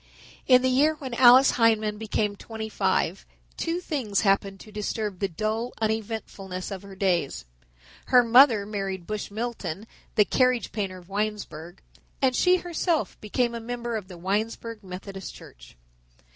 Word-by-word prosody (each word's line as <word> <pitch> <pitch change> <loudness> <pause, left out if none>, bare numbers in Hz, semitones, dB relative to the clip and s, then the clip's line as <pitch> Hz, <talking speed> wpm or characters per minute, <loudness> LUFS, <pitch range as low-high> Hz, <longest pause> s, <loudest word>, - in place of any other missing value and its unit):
In 255 -1 +6
the - - +3
year 290 +5 +3
when 265 -5 -7
Alice 250 +2 +7
Hindman 215 -2 +2
became 210 -1 -1
twenty 220 +1 -7
five - - 0 0.3
two 335 +1 -2
things 260 - -1
happened 195 -1 +1
to 215 - -13
disturb 210 -2 -3
the 195 - 0
dull 215 +6 -3
uneventfulness 215 -4 -3
of 190 -2 -5
her 200 -1 -11
days. 175 - 0 0.6
Her 250 -1 +6
mother 235 -3 +6
married 195 -3 -4
Bush 215 +1 -4
Milton, 215 -4 -4 0.3
the 210 - +5
carriage 250 -2 +1
painter 195 -3 -3
of 175 -1 -15
Winesburg, 195 -5 -4 0.4
and 260 -2 +2
she 360 +6 +4
herself 345 -2 -2
became 235 +3 0
a 235 - -4
member 240 0 -4
of 210 -4 -5
the 180 -2 -10
Winesburg 215 +4 -3
Methodist 190 +1 -8
Church. - - -15
215 Hz, 150 wpm, -26 LUFS, 195-240 Hz, 0.6 s, Alice